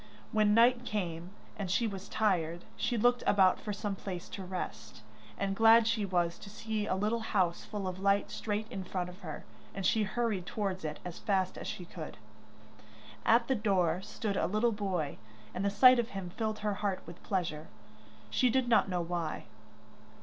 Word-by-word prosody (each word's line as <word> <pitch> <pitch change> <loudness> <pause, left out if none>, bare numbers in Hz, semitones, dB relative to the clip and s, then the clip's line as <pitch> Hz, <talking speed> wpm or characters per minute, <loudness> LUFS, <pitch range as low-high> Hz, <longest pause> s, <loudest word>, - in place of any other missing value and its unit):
When 210 -1 +4
night 240 +1 +5
came, 180 -7 -3 0.3
and 195 -2 -3
she 230 +6 +2
was 195 -3 -5
tired, 175 -5 0
she 240 - -1
looked 245 +2 +3
about 190 -2 +5
for 210 - -4
some 205 0 -3
place 185 -2 -6
to 195 - -6
rest, 185 0 -6 0.3
and 195 0 -1
glad 225 +1 +7
she 225 -2 +1
was 175 -3 0
to 200 - -10
see 215 0 -3
a - - +1
little 210 +4 0
house 185 -6 0
full 205 -3 -4
of 185 0 -4
light 200 +1 +2
straight 210 0 -2
in 190 - -4
front 180 -1 -3
of 180 +2 -12
her, 160 -6 -7 0.3
and 195 -1 -3
she 220 - +3
hurried 210 -3 -1
towards 195 -4 -2
it 150 -1 -3
as 175 -1 -6
fast 190 -2 0
as - - -7
she 180 - -5
could. - - -8 1.1
At 235 +1 +5
the 265 - +3
door 190 -6 +1
stood 210 0 -3
a - - +1
little 215 +5 +2
boy, 190 -8 -2 0.3
and 185 - -2
the 200 - +2
sight 250 +5 +7
of 235 0 0
him 180 -2 -5
filled 215 +2 -2
her 210 - +2
heart 200 -3 -1
with 170 +1 -11
pleasure, 165 -5 -2 0.6
she 255 - +3
did 260 +1 +2
not 225 -4 +4
know 180 -1 0
why. 170 -2 -3
200 Hz, 190 wpm, -32 LUFS, 180-220 Hz, 1.1 s, glad